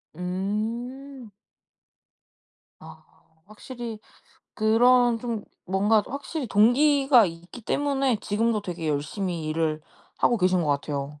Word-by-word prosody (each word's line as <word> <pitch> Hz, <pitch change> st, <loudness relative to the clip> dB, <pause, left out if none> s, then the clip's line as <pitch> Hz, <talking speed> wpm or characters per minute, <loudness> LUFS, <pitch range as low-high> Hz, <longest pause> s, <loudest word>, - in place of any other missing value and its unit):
음. 225 Hz, -, -4 dB, 1.5 s
아 -, -, -13 dB, 0.4 s
확실히 225 Hz, +1 st, -8 dB, 0.6 s
그런 240 Hz, +2 st, +4 dB
좀 230 Hz, -3 st, -4 dB, 0.2 s
뭔가 205 Hz, +3 st, +2 dB
확실히 280 Hz, +1 st, -5 dB
동기가 260 Hz, +4 st, +4 dB
있기 170 Hz, +7 st, -10 dB
때문에 275 Hz, -1 st, 0 dB
지금도 215 Hz, 0 st, 0 dB
되게 175 Hz, -4 st, -5 dB
열심히 165 Hz, +4 st, -3 dB
일을 155 Hz, 0 st, -1 dB, 0.4 s
하고 240 Hz, -, +2 dB
계신 185 Hz, -2 st, +2 dB
거 150 Hz, -, -2 dB
같아요. 145 Hz, 0 st, -3 dB
215 Hz, 210 characters per minute, -25 LUFS, 180-245 Hz, 1.5 s, 그런